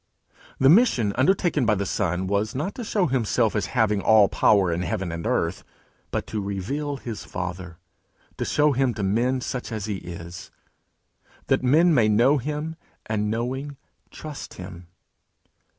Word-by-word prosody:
The 135 - +4
mission 145 - +4
undertaken 155 +1 +2
by 110 -2 +3
the 100 0 -2
Son, 90 -1 -1
was 100 +4 -1
not 155 +9 -2
to 245 - -6
show 205 -3 +1
himself 120 -5 +1
as 100 -2 0
having 105 -3 +2
all 110 -2 +5
power 100 -4 +3
in 85 - -2
heaven 90 -1 -2
and 85 0 -4
earth, - - -1 0.5
but - - -3
to 110 - -4
reveal 135 +10 -3
his 115 -4 -7
Father, 90 -1 -6 0.6
to - - -2
show 150 0 +2
him 130 -3 +1
to 105 - -3
men 120 +6 +1
such 125 -1 -4
as 110 -3 -3
he 105 -2 -3
is, 85 -1 -9 1.0
that - - +3
men 160 +7 +4
may 120 -7 +4
know 125 +7 +4
him, 150 +4 -4 0.3
and 105 -1 -1
knowing, 130 +5 -3 0.3
trust 155 -2 -9
him. 90 -1 -10
110 Hz, 160 wpm, -24 LUFS, 100-140 Hz, 1.0 s, all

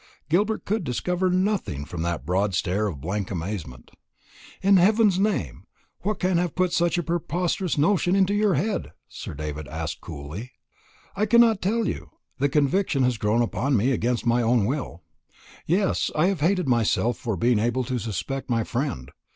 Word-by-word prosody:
Gilbert 205 +7 +1
could 215 0 -1
discover 180 +7 -1
nothing 185 - 0
from 85 +1 -6
that 85 -1 -2
broad 95 +2 0
stare 100 +5 0
of 80 -9 -5
blank 95 +4 -3
amazement. 85 - -5 0.7
"In 195 0 +6
heaven's 205 +1 +4
name, 195 - -1 0.3
what 210 +2 -2
can 180 -1 +1
have 175 -3 -2
put 185 -2 +1
such 175 0 +2
a 175 - 0
preposterous 175 +2 -1
notion 180 +4 +2
into 195 0 +3
your 205 -2 +2
head?" 215 0 -2
Sir - - -8
David 75 0 -5
asked 80 0 -5
coolly. 85 - -8 0.6
"I 210 +2 +1
cannot 230 -2 +5
tell 220 +3 0
you. - - -4 0.3
The 140 +2 +2
conviction 150 +1 +1
has 125 -3 +1
grown 110 +3 +2
upon 130 +3 0
me, 120 +6 +2
against 125 -1 0
my 120 +1 +3
own 115 -2 +2
will. 120 - -3 0.6
Yes, 190 +4 +1
I 155 - +3
have 195 -5 -2
hated 180 +1 +1
myself 120 0 +1
for 110 -5 -2
being 120 +2 +2
able 120 +3 0
to 125 +1 -2
suspect 115 +6 -4
my 115 -2 +1
friend. 115 - -3
135 Hz, 170 wpm, -25 LUFS, -, 0.7 s, In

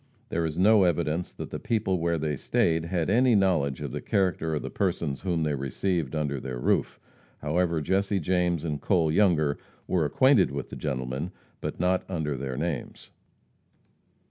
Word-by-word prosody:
There 85 -6 0
is 80 - -5
no 105 +3 +5
evidence 85 -1 0
that - - -7
the - - -4
people 95 -5 0
where 85 0 0
they 75 -1 -1
stayed 80 +4 +1
had 85 -2 -1
any 120 +3 +4
knowledge 85 -9 +2
of - - -4
the - - -4
character 85 -5 0
of 75 - -3
the - - -5
persons 85 -7 -1
whom 85 -4 0
they 75 -1 0
received 70 +3 -2
under 75 -3 -1
their 65 -1 -5
roof. - - 0 0.4
However, 85 +2 0
Jesse 95 +5 +1
James 90 -1 0
and 75 -3 -3
Cole 85 -4 +2
Younger 80 -6 +3 0.3
were 90 -3 +1
acquainted 125 - +4
with 70 +1 -5
the - - -5
gentleman, 65 +3 -3 0.3
but - - -5
not 90 +1 +2
under 80 -6 -2
their 65 -1 -4
names. 75 -3 -4
80 Hz, 170 wpm, -27 LUFS, 75-95 Hz, 0.4 s, no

